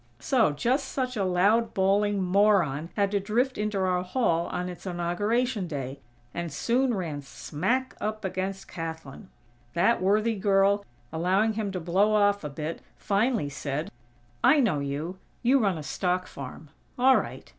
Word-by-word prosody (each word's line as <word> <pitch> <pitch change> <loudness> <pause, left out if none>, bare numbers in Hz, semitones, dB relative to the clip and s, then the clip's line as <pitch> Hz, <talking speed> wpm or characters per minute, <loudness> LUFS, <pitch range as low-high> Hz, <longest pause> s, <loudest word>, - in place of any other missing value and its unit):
So, 240 - +2
just 250 - 0
such 255 -2 -2
a 205 - 0
loud, 200 +6 +2
bawling 200 +1 +2
moron 180 -6 +2
had 200 -1 +1
to 205 - +1
drift 240 +7 0
into 210 -1 -2
our 185 -1 +1
Hall 180 -4 0
on 180 0 -3
its 180 +1 -8
inauguration 205 +5 0
day, 135 -3 -5 0.3
and 170 -1 -4
soon 240 - +1
ran 160 -7 -3
smack 235 - -2
up 215 -1 -3
against 190 +1 -3
Kathlyn! 160 +1 -7 0.5
That 230 +6 +3
worthy 215 +4 +2
girl, 200 0 +3 0.3
allowing 190 +7 +2
him 210 -2 -2
to 185 - -2
"blow 190 +6 +2
off" 205 -2 +3
a 150 - -3
bit, 155 +3 -5 0.2
finally 210 - +1
said: 145 +2 -4 0.5
"I 265 +5 +6
know 210 - +2
you. 145 +6 -4 0.2
You 260 +3 +4
run 195 -7 +1
a 155 - -6
stock 180 +4 -1
farm. 140 +2 -9 0.3
All 260 +1 +6
right. - - -5
195 Hz, 155 wpm, -27 LUFS, 170-215 Hz, 0.5 s, I